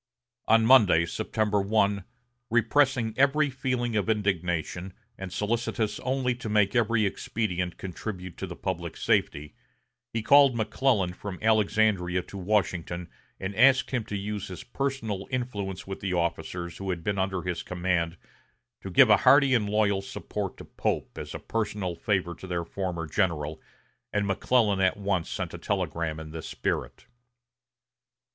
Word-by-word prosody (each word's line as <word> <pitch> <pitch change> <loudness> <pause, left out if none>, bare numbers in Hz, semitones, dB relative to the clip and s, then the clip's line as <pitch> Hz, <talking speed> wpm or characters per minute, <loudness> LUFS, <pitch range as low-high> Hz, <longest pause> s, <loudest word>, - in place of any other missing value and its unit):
On 115 0 +5
Monday, 105 -10 +6
September 105 +2 0
1, 100 -1 +1 0.4
repressing 120 0 +2
every 140 +2 +3
feeling 125 -3 -1
of 105 +1 0
indignation, 90 -3 -1 0.2
and 95 -3 -7
solicitous 110 +1 -1
only 130 -1 0
to 120 -2 -6
make 105 0 +2
every 115 -2 +3
expedient 90 -3 -2
contribute 95 -1 -6
to 95 - -4
the 85 - -7
public 85 -3 -4
safety, 75 +1 0 0.6
he 115 -1 -2
called 140 0 +6
McClellan 110 -4 +1
from 95 0 -7
Alexandria 105 -5 +2
to 100 - -10
Washington 90 -3 -1 0.3
and 95 +1 -4
asked 130 +4 +5
him 125 -3 0
to 105 - -4
use 105 0 -4
his 90 - -8
personal 120 -7 -3
influence 105 -7 -3
with 95 0 -6
the 95 -2 -2
officers 85 0 -2
who 95 -1 -5
had 85 -3 -3
been 100 +1 -1
under 95 -2 -1
his 90 -2 -2
command 85 -2 -1 0.6
to - - -6
give - - +6
a - - +8
hearty 140 -2 +5
and 105 -4 +2
loyal 100 -2 +2
support 100 - -5
to - - -10
Pope - - -2
as - - -7
a - - -4
personal 105 -5 -2
favor 90 0 -1
to 95 - -10
their 85 -2 -2
former 90 -2 -3
general, 80 -4 -1 0.5
and 105 -1 0
McClellan 105 +1 +2
at 95 0 +2
once 95 -4 -1
sent - - -4
a - - -7
telegram 80 -2 -2
in 80 -1 -8
this 80 -1 -7
spirit. - - -3
100 Hz, 150 wpm, -27 LUFS, 90-115 Hz, 0.6 s, a